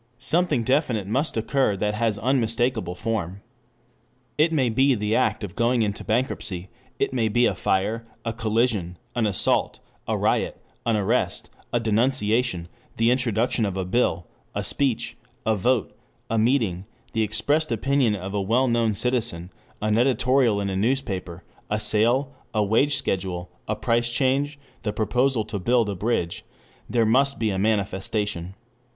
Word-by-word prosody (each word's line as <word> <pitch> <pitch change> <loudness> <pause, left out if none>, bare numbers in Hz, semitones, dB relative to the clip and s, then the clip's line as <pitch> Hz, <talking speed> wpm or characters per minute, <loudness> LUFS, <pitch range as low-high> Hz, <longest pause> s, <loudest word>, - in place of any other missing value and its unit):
Something 145 0 +2
definite 125 -5 +1
must 130 +7 -1
occur 115 -2 +1
that 105 +2 0
has 110 -1 0
unmistakable 115 -5 0
form. 100 -2 -3 0.9
It 155 +4 +3
may 140 -6 +2
be 130 +4 +3
the 105 0 0
act 105 0 +1
of 100 - -6
going 120 0 +2
into 100 -1 -3
bankruptcy, 110 -6 -2 0.3
it - - 0
may 115 -3 +1
be 120 +3 +3
a - - +2
fire, 110 +4 -1 0.2
a 115 - -1
collision, 110 -5 0 0.2
an 115 -3 +1
assault, 100 - +1 0.3
a - - 0
riot, - - 0 0.3
an 115 -2 +3
arrest, 105 +5 0 0.2
a 120 - +2
denunciation, 115 -4 +1 0.3
the 115 +1 +3
introduction 120 -2 +1
of 100 -2 -1
a 95 - -1
bill, 90 -4 +1 0.3
a - - -1
speech, 135 -5 -1 0.3
a 110 0 +3
vote, 115 +2 0 0.4
a 115 - +2
meeting, 110 -6 +1 0.3
the 110 - +1
expressed 145 +8 +1
opinion 125 -1 +2
of 95 0 -6
a 100 - 0
well 120 +7 +2
known 115 -3 +1
citizen, 100 -7 -1 0.3
an 105 +1 +2
editorial 125 -3 +3
in 100 - -1
a - - -2
newspaper, 95 -6 -1 0.3
a 105 - 0
sale, 120 +6 +2 0.2
a 105 - +3
wage 125 +8 +2
schedule, 90 -8 -2 0.2
a 105 - 0
price 120 +1 0
change, 140 +3 +1 0.2
the 105 - -2
proposal 120 +2 +1
to 100 - -4
build 120 +3 +2
a 100 - -2
bridge.... 90 -4 -1 0.5
There 115 -2 +2
must 135 +5 +3
be 110 -2 0
a 95 - -2
manifestation. 100 -2 -1
115 Hz, 155 wpm, -24 LUFS, 100-125 Hz, 0.9 s, It